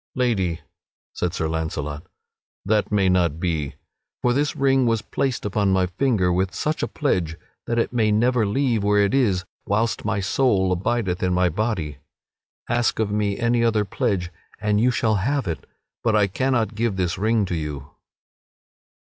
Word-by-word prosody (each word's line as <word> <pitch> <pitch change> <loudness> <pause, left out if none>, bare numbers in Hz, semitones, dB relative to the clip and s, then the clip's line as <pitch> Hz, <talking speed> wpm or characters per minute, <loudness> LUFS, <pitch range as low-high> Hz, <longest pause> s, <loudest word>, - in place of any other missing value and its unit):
"Lady," 95 -10 0 0.5
said 90 - -1
Sir 80 -2 -2
Launcelot, 80 -2 -3 0.6
"that 105 +2 +1
may 100 -2 +3
not 85 -4 +2
be. 80 -5 -2 0.5
For 125 - +3
this 145 +3 0
ring 135 -2 +3
was 115 -2 +1
placed 130 -3 -2
upon 100 -1 +1
my 95 -1 +3
finger 95 -1 +1
with 95 +1 0
such 155 +1 -1
a - - 0
pledge 90 - -1 0.3
that 115 - -1
it 115 - 0
may 110 -3 +2
never 120 +2 +3
leave 115 +1 +1
where 105 0 +3
it 100 - +1
is 100 -9 +2 0.2
whilst 110 +3 0
my 105 0 0
soul 100 -2 +2
abideth 95 0 -1
in 90 -1 +1
my 90 0 +3
body. 85 - -2 0.7
Ask 120 -1 +1
of 110 -2 0
me 105 -1 0
any 120 0 +2
other 110 -3 +2
pledge 95 -5 -1 0.3
and 105 0 +1
you 125 - +4
shall 110 -3 +1
have 135 +5 0
it; 80 -6 -5 0.3
but 110 -2 +2
I 105 -2 +4
cannot 120 +3 0
give 110 -1 -1
this 90 -2 -1
ring 110 0 +2
to 90 - -3
you." 75 -2 -5
105 Hz, 170 wpm, -23 LUFS, 90-115 Hz, 0.7 s, you